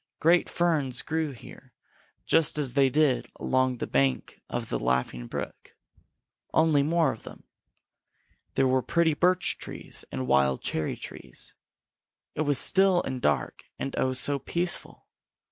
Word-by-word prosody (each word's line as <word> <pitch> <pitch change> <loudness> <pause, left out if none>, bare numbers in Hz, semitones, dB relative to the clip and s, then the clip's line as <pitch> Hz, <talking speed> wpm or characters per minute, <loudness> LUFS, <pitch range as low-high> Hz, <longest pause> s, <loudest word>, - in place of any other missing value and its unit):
Great 170 +2 +3
ferns 150 -8 0
grew 160 0 -1
here 130 0 -14 0.5
just 160 -1 +3
as 140 -5 0
they 135 -1 +4
did 145 -1 +1
along 130 -1 +1
the - - -3
bank 70 -2 0
of - - -4
the - - -1
Laughing 65 -1 -1
Brook, - - -7 0.8
only 160 -2 +4
more 165 +3 +2
of 110 - -13
them. - - -12 1.1
There 135 - +3
were 130 0 +2
pretty 170 +3 +2
birch 180 +4 +2
trees - - -7
and 65 0 -3
wild 65 0 +2
cherry 80 -1 -2
trees. - - -8 0.8
It - - -3
was 145 -3 +3
still 190 -2 +4
and 130 -1 -4
dark 75 - -1
and 135 - -4
oh, 130 - 0
so 140 +2 0
peaceful! 175 +6 -2
135 Hz, 145 wpm, -27 LUFS, 120-160 Hz, 1.1 s, they